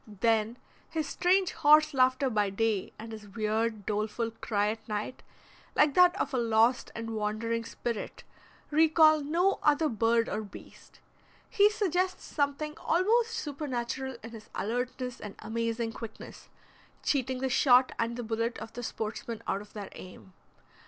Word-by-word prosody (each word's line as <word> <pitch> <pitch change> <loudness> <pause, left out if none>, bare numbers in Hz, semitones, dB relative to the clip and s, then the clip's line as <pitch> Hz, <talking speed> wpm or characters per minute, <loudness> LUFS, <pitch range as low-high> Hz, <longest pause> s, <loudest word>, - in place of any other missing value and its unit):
Then 220 +2 0 0.3
his 315 -2 -2
strange 365 +5 +2
horse 305 +1 +5
laughter 260 0 +3
by 210 -2 +1
day 210 0 -1
and 225 +1 -9
his 215 -1 -9
weird, 215 0 -1
doleful 215 +2 -2
cry 210 -2 -1
at 220 +1 -6
night, 210 +3 -4 0.5
like 295 -1 +4
that 360 +2 +5
of - - -2
a 255 - +1
lost 230 +1 +2
and 230 0 -5
wandering 220 +2 -1
spirit, 230 -1 -5 0.5
recall 310 0 +5
no 340 +7 +1
other 300 +1 +3
bird 230 +1 +2
or 215 - -2
beast. 205 - -13 0.5
He 415 -2 +4
suggests 370 -3 -1
something 295 +1 -2
almost 450 +7 +2
supernatural 265 - -4
in 225 - -8
his 220 -2 -11
alertness 250 +2 -3
and 205 -2 -8
amazing 230 0 -2
quickness, 225 -2 -10 0.5
cheating 260 -2 0
the 265 +1 -1
shot 255 0 +5
and 230 +1 -1
the 245 - -4
bullet 230 +1 -2
of 225 - -9
the 245 - -6
sportsman 225 0 -5
out 195 - -1
of 210 - -15
their 205 -2 -7
aim. 185 0 -12
235 Hz, 150 wpm, -29 LUFS, 220-295 Hz, 0.5 s, horse